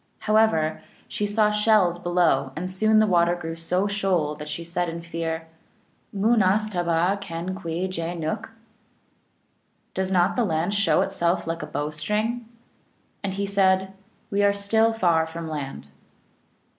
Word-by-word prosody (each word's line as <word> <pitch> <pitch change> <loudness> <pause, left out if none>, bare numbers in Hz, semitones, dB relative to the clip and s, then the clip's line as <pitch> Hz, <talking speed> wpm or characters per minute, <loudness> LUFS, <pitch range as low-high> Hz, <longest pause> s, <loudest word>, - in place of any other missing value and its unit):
However, 215 -8 +2 0.3
she 205 - -2
saw 210 0 +2
shells 210 -5 +3
below, 170 -7 +1
and 180 +4 -3
soon 215 +3 +3
the 215 - +6
water 175 -3 +3
grew 165 -2 -5
so 180 +4 0
shoal 190 -7 0
that 150 0 -8
she 150 +3 -4
said 170 +1 -2
in 170 +1 -6
fear, 165 -1 -4 0.3
" 220 - -40
Moon 220 +2 +2
as 200 +3 +2
tabd 175 +2 +1
kdn 175 0 -5
kwi 175 -1 -3
jean 170 -1 -4
nook? 160 +7 -2
(M.) 225 - -23 1.4
Does 190 0 -2
not 180 0 +3
the 245 - +2
land 170 0 0
show 200 -1 +3
itself 175 -2 0
like 165 0 -3
a - - -5
bow 145 +2 -3
string? 215 +9 -2 0.4
" - - -41
And 190 -1 -2
he 200 0 -1
said, 190 -1 +2 0.2
" - - -38
We 200 0 +1
are 200 0 +3
still 220 +3 +2
far 170 -7 +2
from 165 0 -6
land." 140 - -6
185 Hz, 170 wpm, -24 LUFS, 165-205 Hz, 1.4 s, the